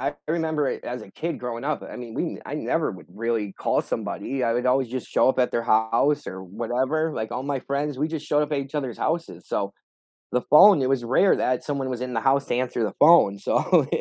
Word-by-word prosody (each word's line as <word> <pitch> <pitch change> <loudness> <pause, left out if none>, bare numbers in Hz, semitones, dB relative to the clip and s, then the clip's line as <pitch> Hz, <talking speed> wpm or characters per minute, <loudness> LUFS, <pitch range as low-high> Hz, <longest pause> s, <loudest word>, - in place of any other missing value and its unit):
I 140 +2 -2
remember 160 -3 0
it - - -4
as 125 -2 -5
a 95 - -13
kid 170 +1 -4
growing 120 -1 -5
up, 150 0 -2
I - - -9
mean, 120 -2 -8
we - - -3
I - - -6
never - - -1
would - - -11
really 110 -2 -2
call - - 0
somebody, 135 -2 -4
I 115 - +2
would 125 +2 -1
always 130 -1 +2
just 130 0 -5
show - - +3
up 130 - +1
at 125 - +2
their 115 - 0
house 115 +6 +2
or 95 0 -6
whatever, 130 - -1
like, 110 +1 -4
all 125 +2 -3
my 140 -2 -2
friends, 140 0 -3
we 150 - 0
just 155 -2 -5
showed 150 0 +2
up 150 - -3
at 145 - +1
each 140 +2 -6
other's 130 -6 -3
houses, 165 +1 -2
so, 100 -1 -2 0.6
the 125 - +1
phone, 180 0 +8
it 130 - +1
was 135 -3 0
rare 135 +11 +4
that 125 -1 0
someone 140 -3 -2
was 125 -2 -4
in 125 -1 -4
the 115 - 0
house 135 +3 +2
to - - -1
answer 125 -2 -1
the - - -3
phone, 145 -11 +6
so. - - +2
130 Hz, 245 wpm, -24 LUFS, 120-150 Hz, 0.6 s, phone